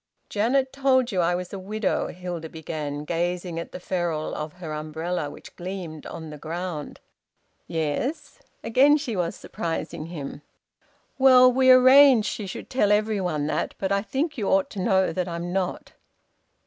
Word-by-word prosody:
"Janet 260 +6 +1
told 260 -2 +2
you 185 -3 +1
I 175 +1 +2
was 180 +1 -5
a 195 - -4
widow," 210 +2 -1
Hilda 175 -3 -6
began, 150 -2 -5
gazing 175 +1 -2
at 170 - -7
the - - -7
ferule 175 -4 -2
of 150 0 -5
her 170 -4 -7
umbrella, 155 +1 -3
which - - -13
gleamed 175 -4 -6
on 160 -2 -8
the 150 - -9
ground. 165 -1 -5 0.7
"Yes." 165 - -3 0.2
Again 270 +6 +5
she 270 -7 -4
was 175 -2 -1
surprising 165 -1 -5
him. 150 -4 -7 0.8
"Well, 255 -1 +7
we 260 +1 +4
arranged 255 -2 +7
she 210 - -4
should 185 - -7
tell 210 -6 +2
every 210 -1 +2
one 155 -5 -1
that. 150 - -2
But 195 0 -2
I 200 0 +2
think 270 +8 -2
you 205 - -1
ought 285 0 +2
to 195 - -5
know 190 -3 +2
that 180 +1 -2
I'm 170 +1 -4
not." 185 -2 -2
180 Hz, 165 wpm, -25 LUFS, 165-230 Hz, 0.8 s, Well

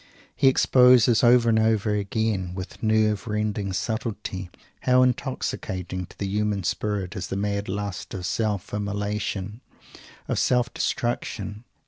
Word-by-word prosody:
He 135 - +3
exposes 125 -3 +5
over 120 0 +6
and 110 -1 +4
over 110 -1 +2
again, 100 -3 -1
with 95 0 -7
nerve 110 0 +2
rending 105 -2 -1
subtlety, 105 -3 -3 0.3
how 125 0 +4
intoxicating 95 -8 -2
to - - -18
the 100 - -3
human 105 0 -1
spirit 100 0 -2
is 95 - -4
the 95 - -3
mad 100 0 -2
lust 100 -1 -4
of 90 -2 -5
self 100 +1 -2
immolation, 105 +1 -3 0.7
of - - 0
self 125 -1 +2
destruction. 110 -2 -3
105 Hz, 130 wpm, -25 LUFS, 100-115 Hz, 0.7 s, over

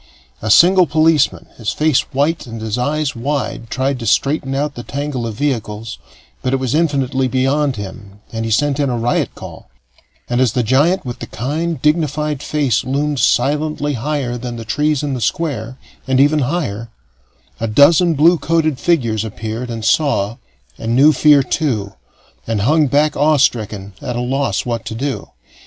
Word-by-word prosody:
A 110 - -3
single 175 - +6
policeman, 155 0 +2
his 110 -2 -2
face 155 -3 +2
white 145 +2 0
and 115 -1 -7
his 110 -1 -3
eyes 145 +3 -1
wide, 120 -2 -3
tried 130 +1 -1
to 115 - -5
straighten 135 +3 +1
out 145 +1 -1
the 120 - -7
tangle 140 -2 -4
of 110 - -5
vehicles, 115 -5 -3 0.4
but 130 - -1
it 135 - +1
was 130 -3 -2
infinitely 135 -5 +1
beyond 135 +2 +1
him 100 0 -9
and 115 0 -3
he 115 - -3
sent 145 +5 +1
in 140 -2 +1
a 120 - -1
riot 120 +1 -1
call; - - -11 0.6
and 120 +1 0
as 125 -5 +2
the 125 - +1
giant 145 - +2
with 120 -1 -6
the - - -7
kind, 155 +7 -3
dignified 150 -2 0
face 140 -7 0
loomed 145 +1 -1
silently 145 +3 +1
higher 130 -1 -2
than 120 0 -5
the 115 -1 -7
trees 150 +6 0
in 145 -2 -2
the 125 - -4
Square, 130 -3 -2 0.3
and 130 0 +2
ever 145 +2 +4
higher, 115 - -3 0.7
a 115 - -1
dozen 155 +9 +5
blue 165 +4 +4
coated 155 -5 0
figures 115 -8 +1
appeared, 110 +2 -5
and 115 -2 -5
saw, 115 -4 +1 0.4
and 115 +1 -1
knew 145 +4 +6
fear 145 0 +5
too, 110 -10 -2 0.5
and 110 -3 -1
hung 150 +6 +3
back 145 +3 +2
awe 150 +1 +3
stricken, 105 -7 0
at 125 - -4
a - - -2
loss 125 -3 -1
what 120 -2 -3
to 110 - -6
do. 135 +3 -3
135 Hz, 175 wpm, -17 LUFS, 115-150 Hz, 0.7 s, single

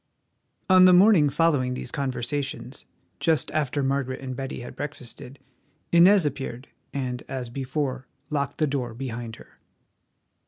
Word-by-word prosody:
On 185 -1 +7
the 185 - +7
morning 180 -6 +6
following 140 -4 +1
these - - -6
conversations, 135 0 -4 0.3
just 160 -2 +1
after 145 -2 0
Margaret 135 -1 -1
and 130 -1 -6
Betty 135 -1 -5
had 120 - -9
breakfasted, 135 -2 -8 0.5
Inez 180 +1 +6
appeared, 135 -2 -4 0.2
and, 125 -3 -3
as 125 -3 -5
before, 130 0 -3 0.2
locked 140 -1 -2
the 155 - +2
door 130 -5 -3
behind 120 -3 -5
her. - - -18
135 Hz, 130 wpm, -25 LUFS, 125-150 Hz, 0.5 s, On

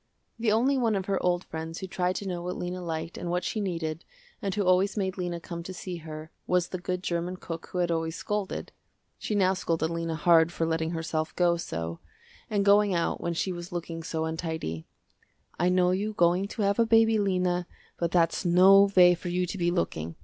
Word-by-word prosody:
The 225 -2 +2
only 260 +5 +3
one 230 -3 +2
of 190 -1 -2
her 195 -1 0
old 180 0 +1
friends 160 +1 -6
who - - -5
tried 180 0 -1
to 200 - -4
know 175 -2 -3
what 180 +1 -4
Lena 180 +1 -4
liked 165 -1 -4
and 175 - -4
what 180 +1 0
she 215 - -2
needed, 165 -4 -3 0.4
and 200 - -1
who 205 - +1
always 185 +3 +3
made 190 -2 -1
Lena 175 -2 -3
come 170 0 -7
to 185 +2 -8
see 180 0 -5
her, 155 -1 -9 0.2
was 180 -1 +1
the 185 - -4
good 180 +1 -3
german 175 +1 -2
cook 165 -2 -7
who - - -6
had 175 -1 +1
always 165 0 -1
scolded. 210 0 -3 0.5
She 210 - -2
now 190 -2 +3
scolded 165 -3 -1
Lena 165 -1 -2
hard 165 +1 +4
for 165 - -1
letting 160 0 0
herself 160 -1 -3
go 175 -1 +3
so, 85 - -4 0.5
and 205 -2 +1
going 205 -1 +5
out 170 - -1
when 170 0 -2
she 185 - -1
was 175 0 -7
looking 170 -1 -5
so 160 0 -2
untidy. 160 - -4 0.7
"I 175 +2 +3
know 180 0 +3
you 205 +4 -1
going 180 +1 +2
to 210 +1 -3
have 200 +2 +1
a 230 - +5
baby 225 -1 +5
Lena, 180 -3 0 0.3
but 170 - +1
that's 170 0 +2
no 190 +3 +6
way 180 -1 +8
for 175 +1 -6
you 180 +1 0
to 180 - -5
be 175 -2 +1
looking. 85 - -2
175 Hz, 215 wpm, -28 LUFS, 165-190 Hz, 0.7 s, way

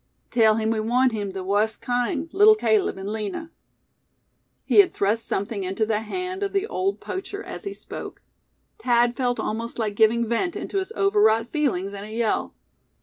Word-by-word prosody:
Tell 220 -3 +4
him 220 0 0
we 225 - 0
want 245 +4 +2
him 205 -3 -3
the 190 -1 -5
wust 205 +3 0
kind, 245 +5 -1
Leetle 420 +2 +7
Caleb 430 - +1
an' 195 +2 -5
Lina!'" 220 - -5 1.1
He - - +4
had 395 - +5
thrust 215 +3 +1
something 200 0 -2
into 195 +4 -1
the 215 -1 0
hand 365 - -4
of 400 -1 -2
the 395 +1 +1
old 395 -3 -2
poacher 395 +2 -6
as - - -8
he 395 - -4
spoke. - - -9 0.6
Thad 240 - +2
felt 245 -2 -1
almost 230 +2 -3
like 215 -3 -1
giving 230 +2 +3
vent 335 - -1
into 395 - -2
his 380 +3 -5
overwrought 395 - +3
feelings 200 - -1
in 200 0 -7
a 215 - -9
yell. 225 -1 -1
235 Hz, 180 wpm, -24 LUFS, -, 1.1 s, Leetle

